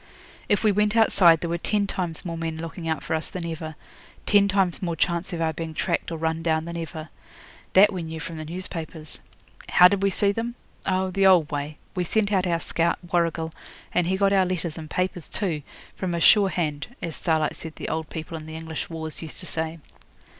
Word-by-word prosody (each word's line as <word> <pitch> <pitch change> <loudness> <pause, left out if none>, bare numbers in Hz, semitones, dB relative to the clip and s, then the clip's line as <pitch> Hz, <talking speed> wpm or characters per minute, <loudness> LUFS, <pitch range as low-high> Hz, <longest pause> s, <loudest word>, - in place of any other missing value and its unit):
If 205 - +3
we 215 - +5
went 210 +2 +2
outside 180 -7 +6
there 170 - -2
were 170 - -1
ten 205 +3 +1
times 175 -4 -3
more 170 -1 -3
men 165 -1 -3
looking 165 +1 -6
out 160 -2 -1
for - - -2
us 160 0 0
than 180 -2 -5
ever, 160 -1 -5 0.5
ten 200 -1 +5
times 195 -3 +2
more 170 -3 -1
chance 170 +4 0
of 170 -2 -3
our 160 -1 +1
being 160 0 -5
tracked - - -1
or 165 - -3
run 160 0 -1
down 160 -1 +1
than 170 0 -6
ever. 160 -1 -6 0.6
That 205 +2 +7
we 185 - -3
knew 160 0 -5
from 160 +1 -6
the 155 - -5
newspapers. 165 -2 -5 0.5
How 180 - +8
did 200 +1 0
we 195 - +3
see 200 +1 +2
them? 230 +3 -3 0.3
Oh, 185 0 +1
the 195 +1 +4
old 175 -6 +5
way. 145 +1 -3 0.2
We 180 -2 0
sent 205 +3 +1
out 190 -2 +2
our 170 -1 +1
scout, 170 0 0 0.2
Warrigal, 165 -2 +1 0.4
and 180 -1 +2
he 190 +1 +1
got 200 0 +3
our 190 -2 +4
letters 170 -3 -2
and 155 -2 -8
papers 180 -2 -2
too, 170 -8 -1 0.3
from 180 -2 -2
a - - -1
'sure 200 +3 +6
hand', 150 -6 -2 0.2
as 165 -2 -3
Starlight 160 -3 +1
said 160 -1 -8
the - - -5
old 160 -1 -2
people 160 +1 -6
in 155 -1 -7
the 160 - -7
English 160 -1 -5
wars 160 -2 -5
used 160 -2 -8
to - - -7
say. 160 -1 -1
170 Hz, 220 wpm, -25 LUFS, 160-185 Hz, 0.6 s, How